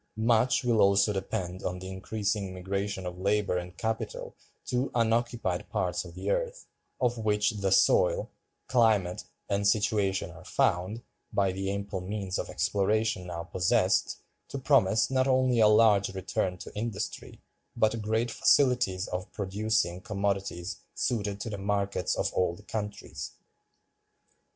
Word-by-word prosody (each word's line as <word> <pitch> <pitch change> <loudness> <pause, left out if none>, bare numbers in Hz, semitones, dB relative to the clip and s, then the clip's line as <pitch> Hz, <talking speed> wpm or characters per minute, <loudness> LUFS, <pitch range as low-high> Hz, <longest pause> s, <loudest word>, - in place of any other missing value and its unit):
Much 115 +3 +3
will 120 -3 +3
also 100 +1 +4
depend 95 -2 -3
on 90 - -3
the 95 +1 -8
increasing 100 0 -2
migration 95 +1 -3
of 90 0 -6
labor 100 0 +1
and 90 0 -5
capital 110 -1 -3 0.3
to 125 +2 0
unoccupied 120 +1 0
parts - - -1
of - - -11
the - - -2
earth, - - -2 0.3
of 120 -2 +1
which 105 0 +2
the 100 -3 -2
soil, - - +3 0.3
climate, 110 -7 +2 0.2
and 100 0 +1
situation 100 -2 +1
are - - -13
found, 95 +7 0 0.3
by 100 -2 +2
the 95 +1 -3
ample 100 -1 -3
means 95 0 -3
of - - -4
exploration 105 -1 0
now 85 -1 -5
possessed, 85 +1 +1 0.3
to - - -5
promise 130 -6 +3
not 130 0 +2
only 130 -2 +3
a 110 - +7
large 105 -2 +5
return 95 -1 -2
to - - -10
industry, 105 -1 -4 0.4
but 110 +1 +1
great 110 +2 0
facilities 120 -11 +3
of 90 +1 -4
producing 100 -2 -1
commodities 100 -3 -2 0.2
suited 105 -4 -1
to - - -5
the 100 - -5
markets 100 -2 0
of - - 0
old 90 +2 -1
countries. 105 -2 -5
105 Hz, 140 wpm, -29 LUFS, 95-115 Hz, 0.4 s, a